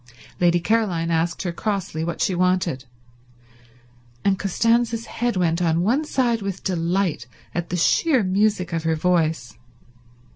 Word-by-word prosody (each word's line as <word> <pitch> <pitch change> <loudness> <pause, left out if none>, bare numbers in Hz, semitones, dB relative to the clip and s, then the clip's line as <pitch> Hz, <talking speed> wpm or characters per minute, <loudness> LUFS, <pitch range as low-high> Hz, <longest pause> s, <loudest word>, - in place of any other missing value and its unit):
Lady 175 0 +3
Caroline 175 -4 0
asked 165 +2 0
her 180 - -2
crossly 185 -4 -3
what 170 +1 -4
she 190 - +1
wanted, 180 -7 0 1.4
and 195 -1 +2
Costanza's 230 +3 +1
head 240 -4 -2
went 170 -1 +1
on 165 0 +1
one 260 +10 +1
side 240 -6 0
with 195 -1 -5
delight 175 - -1 0.3
at 175 0 -3
the 180 - -2
sheer 260 - +3
music 190 -2 +1
of 165 - 0
her 160 0 0
voice. 160 -8 0
180 Hz, 140 wpm, -22 LUFS, 165-215 Hz, 1.4 s, Lady